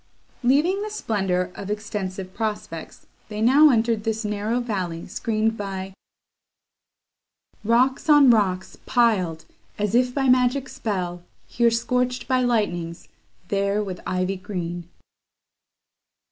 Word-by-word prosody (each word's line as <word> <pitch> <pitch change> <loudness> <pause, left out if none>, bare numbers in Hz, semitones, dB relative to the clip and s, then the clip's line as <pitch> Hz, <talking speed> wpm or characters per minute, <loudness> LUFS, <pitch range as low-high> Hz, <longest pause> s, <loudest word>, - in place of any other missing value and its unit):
Leaving 300 +10 +2
the 425 - -3
splendour 190 - -1
of 200 - -7
extensive 195 -3 -4
prospects, 210 -7 -5 0.2
they 210 -1 -5
now 275 +7 +6
entered 230 -3 +2
this 220 0 -2
narrow 210 +3 -1
valley 185 -8 -3
screened 220 0 -1
by 195 -2 -5 1.7
Rocks 250 +7 +2
on 290 -4 +8
rocks 190 -5 0
piled, 190 -10 +2 0.3
as 210 0 -1
if 250 +1 +3
by 270 +1 0
magic 255 +1 +3
spell, 185 -9 -3 0.2
Here 235 -1 +2
scorch'd 250 +2 -1
by 255 -1 +2
lightnings, 175 -9 -1 0.4
there 200 +1 +1
with 185 -3 -6
ivy 185 +1 -1
green. 175 -3 -5
215 Hz, 115 wpm, -23 LUFS, 190-245 Hz, 1.7 s, on